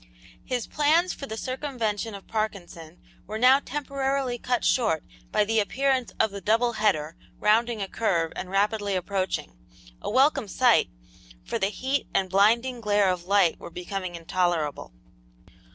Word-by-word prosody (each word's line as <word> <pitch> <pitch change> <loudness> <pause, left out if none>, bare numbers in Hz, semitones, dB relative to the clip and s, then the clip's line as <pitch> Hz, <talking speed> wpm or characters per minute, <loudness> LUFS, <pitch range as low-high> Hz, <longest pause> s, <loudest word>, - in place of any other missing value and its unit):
His 250 -2 -2
plans 320 +5 +2
for 275 - -8
the 220 - -6
circumvention 230 -5 -3
of 195 - -11
Parkinson 180 -6 -5 0.3
were 215 +2 -4
now 255 +4 +6
temporarily 275 -3 -2
cut 245 0 -1
short 215 - +2 0.3
by - - +3
the 220 +2 +1
appearance 260 +4 0
of 220 - +3
the 200 0 -7
"double 230 +5 +2
header" 165 -8 0 0.2
rounding 220 +1 +2
a - - -4
curve 170 -7 0
and 185 - -5
rapidly 205 +1 0
approaching 185 - -3 0.4
a - - -4
welcome 270 0 +3
sight, 245 +4 +3 0.6
for - - -3
the 195 - +2
heat 265 +6 -2
and 190 -1 +1
blinding 230 +5 +3
glare 205 -2 +3
of 175 -1 -4
light 195 -3 +3
were - - -9
becoming 180 +1 -5
intolerable. 170 - -1
215 Hz, 150 wpm, -26 LUFS, 190-250 Hz, 0.6 s, now